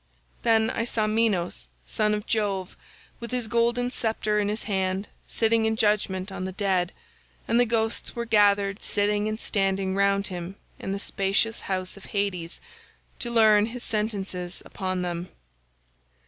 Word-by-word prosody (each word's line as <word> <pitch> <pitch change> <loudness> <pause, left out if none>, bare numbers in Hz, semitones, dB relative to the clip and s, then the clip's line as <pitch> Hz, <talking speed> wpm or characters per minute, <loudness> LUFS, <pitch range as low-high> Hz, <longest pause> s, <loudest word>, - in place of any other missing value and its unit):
"Then 225 -1 +3
I 230 - -1
saw 225 -2 0
Minos 210 - 0 0.2
son 210 0 +1
of 210 - -5
Jove 200 -4 -1 0.4
with 235 - -6
his 250 -2 -1
golden 235 +2 +1
sceptre 220 -3 0
in 205 -1 +1
his 215 +1 -2
hand 190 0 -1 0.2
sitting 225 0 +2
in 220 0 +2
judgement 205 -3 +1
on 190 - -5
the 190 - -3
dead, 185 -2 0 0.6
and 235 - +3
the 245 - +4
ghosts 225 0 -1
were 235 0 -2
gathered 205 -2 +3
sitting 205 +1 +1
and 215 0 -2
standing 195 -3 0
round 200 0 +2
him 180 0 -4 0.2
in - - -4
the 195 - -1
spacious 200 +3 0
house 185 0 -3
of 195 - -12
Hades, 190 -4 -2 0.6
to 240 - -2
learn 220 -2 +5
his 240 +1 -7
sentences 195 -4 -3
upon 185 -2 -3
them. 175 0 -3
205 Hz, 155 wpm, -26 LUFS, 190-220 Hz, 0.6 s, learn